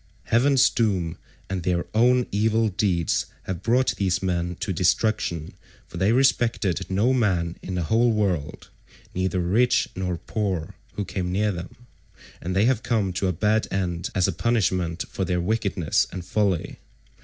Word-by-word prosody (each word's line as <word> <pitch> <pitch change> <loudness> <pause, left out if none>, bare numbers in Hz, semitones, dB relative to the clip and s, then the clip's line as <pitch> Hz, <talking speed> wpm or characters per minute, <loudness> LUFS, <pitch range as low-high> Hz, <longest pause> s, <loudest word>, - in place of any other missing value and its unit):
Heaven's 130 +3 +4
doom 95 -8 0 0.3
and 95 -1 -3
their 85 0 0
own 125 +2 +4
evil 110 +2 +2
deeds 90 -5 0 0.2
have 90 -3 -5
brought 125 +3 +2
these 95 -1 0
men 90 -1 -1
to - - -3
destruction, 90 -6 0 0.3
for 85 - -10
they 95 +5 +2
respected 115 -7 +1
no 105 +7 +2
man 90 -9 0
in 95 - -5
the 90 - -1
whole 115 +8 +3
world, 90 -9 -2 0.4
neither 95 0 -1
rich 110 +8 +2
nor 90 -2 -2
poor, 95 -5 -3 0.2
who 105 - -3
came 90 -2 -3
near 105 +3 +1
them, 85 -1 -7 0.7
and 90 +2 -3
they 100 +3 +4
have 120 -2 +2
come 105 -6 0
to 95 +2 -1
a - - +2
bad 105 +6 +1
end 90 -3 -2
as 90 0 +3
a - - +1
punishment 90 -4 0
for 95 - -4
their 90 -1 0
wickedness 95 -4 0
and 90 -1 -6
folly. 95 -3 -1
95 Hz, 160 wpm, -24 LUFS, 90-110 Hz, 0.7 s, Heaven's